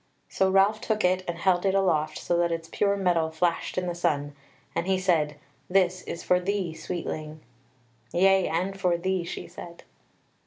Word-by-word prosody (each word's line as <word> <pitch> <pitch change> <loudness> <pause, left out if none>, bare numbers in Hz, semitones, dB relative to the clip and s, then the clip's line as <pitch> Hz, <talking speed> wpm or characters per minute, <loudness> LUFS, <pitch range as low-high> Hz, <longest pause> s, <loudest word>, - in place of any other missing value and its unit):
So 190 - +2
Ralph 195 +3 +3
took 215 -3 0
it 185 +1 +2
and 175 -1 -3
held 175 0 +2
it 195 -1 +2
aloft 155 -5 +1
so 175 - -1
that 170 0 +2
its 165 0 -4
pure 200 -1 +1
metal 175 -4 +1
flashed 170 +3 -1
in 185 - 0
the 175 - -2
sun, 145 -4 -1 0.4
and 170 - -2
he 190 -1 +2
said: 165 -5 +1 0.3
"This 185 -1 +2
is 170 - -6
for 180 - +3
thee, 185 -2 -2
Sweetling." 155 -2 -5 0.7
"Yea, 190 +1 +4
and 185 +4 -2
for 180 -2 +2
thee," 185 +1 -1
she 170 - -6
said. 170 0 -11
180 Hz, 180 wpm, -27 LUFS, 170-190 Hz, 0.7 s, Yea